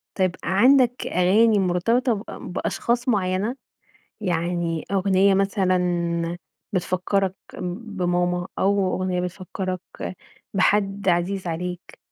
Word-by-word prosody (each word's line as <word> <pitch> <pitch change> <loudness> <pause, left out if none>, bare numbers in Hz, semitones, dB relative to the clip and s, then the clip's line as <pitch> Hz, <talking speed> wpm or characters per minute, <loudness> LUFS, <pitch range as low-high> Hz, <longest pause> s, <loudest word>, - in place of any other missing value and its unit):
طيب 185 -2 +1
عندك 250 +5 +4
أغاني 205 +5 +4
مرتبطة 230 +7 +2
ب 205 -1 -4 0.3
بأشخاص 240 +6 -1
معيّنة؟ 200 +2 0 0.7
يعني 170 -3 -1
أغنية 195 0 +3
مثلًا 180 -3 +1 0.4
بتفكرك 185 +1 0 0.4
بماما 180 -4 -1
أو 195 -1 +2
أغنية 185 -1 -1
بتفكرك 185 +1 -4 0.7
بحد 195 0 +2
عزيز 180 +2 0
عليك؟ 180 +2 -5
185 Hz, 90 wpm, -23 LUFS, 180-200 Hz, 0.7 s, عندك